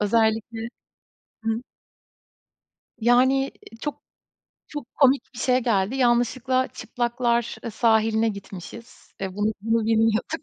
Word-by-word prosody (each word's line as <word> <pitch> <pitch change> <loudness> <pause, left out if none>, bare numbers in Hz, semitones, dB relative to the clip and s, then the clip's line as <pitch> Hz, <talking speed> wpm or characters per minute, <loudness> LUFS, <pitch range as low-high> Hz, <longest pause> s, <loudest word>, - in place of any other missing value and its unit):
Özellikle, 225 +1 +1 0.8
hıı. 225 +1 -1 1.4
Yani, 250 +4 +4
ııı, 230 -4 -9
çok 295 +3 -5 0.7
çok 295 -5 -8
komik 275 -1 +4
bir - - -9
şey 250 0 +3
geldi. 225 -1 +1
Yanlışlıkla 255 +1 +2
çıplaklar, 240 -1 -1
ııı, 230 - -3
sahiline 220 0 +3
gitmişiz. 200 +3 -9
E, 190 -1 -4
bunu 210 +1 +1
bunu 225 +1 +1
bilmiyorduk 225 +7 +1
230 Hz, 110 wpm, -24 LUFS, 220-250 Hz, 1.4 s, Yani